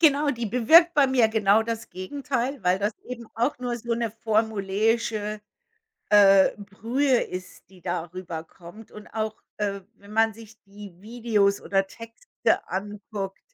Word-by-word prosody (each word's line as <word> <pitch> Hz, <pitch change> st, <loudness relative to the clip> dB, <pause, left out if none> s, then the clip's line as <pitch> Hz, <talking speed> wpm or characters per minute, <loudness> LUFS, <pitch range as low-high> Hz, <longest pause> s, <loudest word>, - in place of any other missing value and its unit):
Genau, 295 Hz, -2 st, +4 dB
die 235 Hz, -4 st, -3 dB
bewirkt 320 Hz, -, +5 dB
bei 285 Hz, -2 st, +5 dB
mir 250 Hz, -4 st, +3 dB
genau 220 Hz, -1 st, +3 dB
das 230 Hz, 0 st, -5 dB
Gegenteil, 260 Hz, +6 st, -3 dB
weil 180 Hz, +1 st, +2 dB
das 205 Hz, +2 st, 0 dB
eben 240 Hz, -2 st, -8 dB
auch 240 Hz, +5 st, 0 dB
nur 245 Hz, -1 st, -3 dB
so 235 Hz, 0 st, -4 dB
'ne 230 Hz, -1 st, -1 dB
formuläische, 215 Hz, 0 st, -1 dB, 0.7 s
äh, 195 Hz, -2 st, +7 dB
Brühe 235 Hz, +6 st, 0 dB
ist, 185 Hz, 0 st, -8 dB
die 185 Hz, -, -18 dB
da 175 Hz, -1 st, -3 dB
rüberkommt 175 Hz, +3 st, -9 dB
und 210 Hz, 0 st, -11 dB
auch, 220 Hz, -1 st, -4 dB
äh, 200 Hz, -1 st, -2 dB
wenn 200 Hz, +1 st, -16 dB
man 225 Hz, -1 st, +2 dB
sich 225 Hz, -1 st, -15 dB
die 200 Hz, -1 st, -12 dB
Videos 215 Hz, -2 st, 0 dB
oder 195 Hz, -1 st, +1 dB
Texte 230 Hz, -, -13 dB, 0.4 s
anguckt. 200 Hz, 0 st, -5 dB
220 Hz, 145 wpm, -25 LUFS, 200-235 Hz, 0.7 s, äh